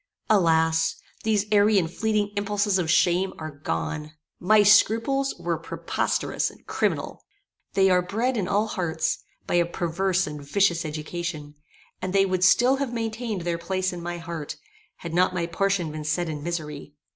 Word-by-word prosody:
Alas! 160 Hz, -4 st, +3 dB, 0.3 s
these 215 Hz, -2 st, +1 dB
airy 210 Hz, 0 st, +5 dB
and 170 Hz, -3 st, +1 dB
fleeting 215 Hz, -2 st, 0 dB
impulses 205 Hz, -1 st, +1 dB
of 165 Hz, -3 st, -1 dB
shame 175 Hz, +3 st, +3 dB
are 155 Hz, -1 st, -6 dB
gone. 150 Hz, -, -4 dB, 0.3 s
My 210 Hz, +3 st, +5 dB
scruples 230 Hz, +6 st, +4 dB
were 170 Hz, -2 st, -2 dB
preposterous 165 Hz, -, -1 dB
and -, -, -19 dB
criminal. -, -, -2 dB, 0.5 s
They 190 Hz, -1 st, +4 dB
are 180 Hz, 0 st, +4 dB
bred 225 Hz, +8 st, -1 dB
in 200 Hz, -5 st, -1 dB
all 205 Hz, +3 st, +2 dB
hearts, 170 Hz, -6 st, -1 dB, 0.3 s
by -, -, -3 dB
a -, -, +1 dB
perverse 185 Hz, +2 st, 0 dB
and 150 Hz, -1 st, -7 dB
vicious 170 Hz, +3 st, +1 dB
education, 155 Hz, 0 st, -5 dB, 0.5 s
and 185 Hz, 0 st, -3 dB
they 195 Hz, 0 st, +4 dB
would 185 Hz, -1 st, 0 dB
still 245 Hz, +7 st, +5 dB
have 275 Hz, -3 st, -2 dB
maintained 225 Hz, -3 st, -3 dB
their 170 Hz, 0 st, -2 dB
place 185 Hz, +2 st, -1 dB
in 175 Hz, -, -6 dB
my 175 Hz, 0 st, -4 dB
heart, 165 Hz, -3 st, -6 dB, 0.4 s
had 170 Hz, -1 st, -8 dB
not 180 Hz, +1 st, +2 dB
my 170 Hz, -2 st, 0 dB
portion 180 Hz, -1 st, 0 dB
been 155 Hz, 0 st, -6 dB
set 160 Hz, +3 st, -1 dB
in 150 Hz, -2 st, -5 dB
misery. 150 Hz, -3 st, -5 dB
180 Hz, 165 wpm, -25 LUFS, 160-205 Hz, 0.5 s, airy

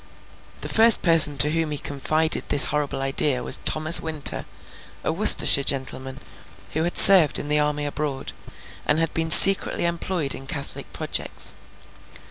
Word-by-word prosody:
The -, -, -9 dB
first 225 Hz, 0 st, 0 dB
person 160 Hz, -4 st, +4 dB
to 150 Hz, +2 st, +1 dB
whom 165 Hz, -1 st, -5 dB
he 150 Hz, -, -7 dB
confided 155 Hz, +3 st, -4 dB
this 145 Hz, -, +4 dB
horrible 145 Hz, -2 st, -6 dB
idea 135 Hz, -1 st, -3 dB
was -, -, +1 dB
Thomas 155 Hz, +2 st, +3 dB
Winter, 155 Hz, -3 st, -2 dB, 0.6 s
a -, -, -5 dB
Worcestershire 140 Hz, -, +3 dB
gentleman 130 Hz, 0 st, -4 dB, 0.5 s
who 160 Hz, +2 st, -6 dB
had 175 Hz, -, -7 dB
served 185 Hz, -7 st, +5 dB
in 145 Hz, -, -10 dB
the 150 Hz, 0 st, -2 dB
army 150 Hz, 0 st, -5 dB
abroad, 145 Hz, -2 st, -9 dB, 0.5 s
and 145 Hz, -, -2 dB
had 165 Hz, 0 st, -5 dB
been 160 Hz, 0 st, -6 dB
secretly 195 Hz, +1 st, +6 dB
employed 170 Hz, -3 st, -5 dB
in 135 Hz, -, -13 dB
Catholic 140 Hz, -1 st, -9 dB
projects. -, -, -6 dB
150 Hz, 150 wpm, -19 LUFS, 140-165 Hz, 0.6 s, secretly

